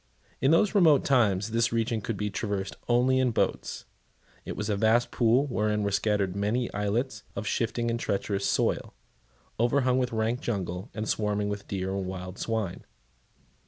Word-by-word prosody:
In 135 Hz, -, +4 dB
those 165 Hz, +6 st, +4 dB
remote 165 Hz, -9 st, +5 dB
times 110 Hz, -6 st, +2 dB
this 115 Hz, 0 st, +2 dB
region 115 Hz, -1 st, 0 dB
could 105 Hz, +1 st, -3 dB
be 105 Hz, 0 st, -2 dB
traversed 100 Hz, -2 st, -3 dB
only 125 Hz, +2 st, +3 dB
in 130 Hz, -1 st, +3 dB
boats. 115 Hz, -, -1 dB, 0.6 s
It -, -, -5 dB
was 105 Hz, -, -3 dB
a 105 Hz, -, +1 dB
vast 110 Hz, +4 st, +2 dB
pool, 120 Hz, +3 st, +3 dB
wherein 105 Hz, -5 st, 0 dB
were 100 Hz, -, 0 dB
scattered 100 Hz, -2 st, +1 dB
many 110 Hz, +5 st, -1 dB
islets 105 Hz, +3 st, -1 dB
of 100 Hz, -, -4 dB
shifting 115 Hz, +2 st, -1 dB
and 115 Hz, -, -2 dB
treacherous 100 Hz, -2 st, -1 dB
soil, -, -, 0 dB, 0.6 s
overhung 125 Hz, +1 st, +2 dB
with 125 Hz, -1 st, 0 dB
rank 115 Hz, +2 st, 0 dB
jungle, 95 Hz, -2 st, -3 dB
and 110 Hz, +1 st, -3 dB
swarming 105 Hz, -1 st, 0 dB
with 105 Hz, -1 st, -5 dB
deer 95 Hz, -1 st, -2 dB
and 95 Hz, -1 st, -3 dB
wild 90 Hz, 0 st, -6 dB
swine. 110 Hz, -5 st, -2 dB
110 Hz, 165 wpm, -28 LUFS, 100-120 Hz, 0.6 s, remote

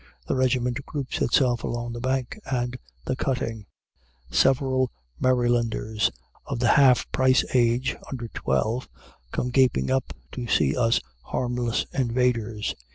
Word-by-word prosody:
The -, -, 0 dB
regiment 125 Hz, 0 st, +1 dB
groups 140 Hz, -3 st, -4 dB
itself 125 Hz, -3 st, +2 dB
along 120 Hz, 0 st, -3 dB
the 120 Hz, -, -5 dB
bank 130 Hz, -, -2 dB
and 125 Hz, -1 st, -1 dB, 0.3 s
the 130 Hz, -, -1 dB
cutting. 115 Hz, -6 st, -2 dB, 0.6 s
Several 130 Hz, -, +3 dB, 0.3 s
Marylanders 120 Hz, -3 st, +1 dB, 0.4 s
of -, -, -3 dB
the 120 Hz, 0 st, +2 dB
half 135 Hz, -4 st, +5 dB
price 130 Hz, -1 st, +3 dB
age 120 Hz, 0 st, +2 dB
under 125 Hz, -4 st, -5 dB
twelve 110 Hz, -, -1 dB, 0.4 s
come 125 Hz, -, -2 dB
gaping 130 Hz, 0 st, +3 dB
up 130 Hz, -1 st, 0 dB, 0.2 s
to 125 Hz, -2 st, -5 dB
see -, -, +2 dB
us 115 Hz, -2 st, +2 dB, 0.2 s
harmless 120 Hz, -2 st, -1 dB
invaders. 120 Hz, -4 st, 0 dB
125 Hz, 125 wpm, -25 LUFS, 120-130 Hz, 0.6 s, half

